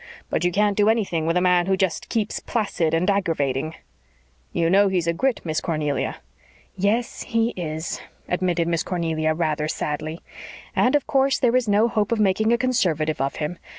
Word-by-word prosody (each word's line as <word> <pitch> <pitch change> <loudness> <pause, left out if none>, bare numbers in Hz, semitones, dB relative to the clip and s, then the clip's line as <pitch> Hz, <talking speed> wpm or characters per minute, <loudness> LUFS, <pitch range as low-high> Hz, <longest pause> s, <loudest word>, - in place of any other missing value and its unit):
But - - 0
you 175 - +2
can't 205 +2 +2
do 210 +1 +3
anything 190 -8 0
with 165 +2 +2
a - - +2
man 180 -1 +3
who 190 0 +2
just 190 -3 -1
keeps 220 -3 -1
placid 180 -8 -1
and 170 +3 +1
aggravating." 160 -7 0 0.8
"You 165 - +1
know 200 +4 +5
he's 185 -3 0
a 170 - +1
Grit, 260 +8 0
Miss 155 -2 -2
Cornelia." 150 -4 -1 0.6
"Yes, 210 +5 0
he 230 0 0
IS," 160 -2 -4 0.3
admitted 180 -2 0
Miss 170 -1 +1
Cornelia 160 -3 -1
rather 155 -2 -1
sadly. 155 +1 -3 0.6
"And 250 +3 +3
of 290 - +1
course 270 0 +2
there 245 -1 +2
is 255 -3 +2
no 210 +3 +4
hope 215 -2 -1
of 230 - +1
making 210 +2 +2
a 235 - +4
Conservative 175 - 0
of 135 0 -1
him. 160 +3 -4
180 Hz, 185 wpm, -23 LUFS, 160-215 Hz, 0.8 s, know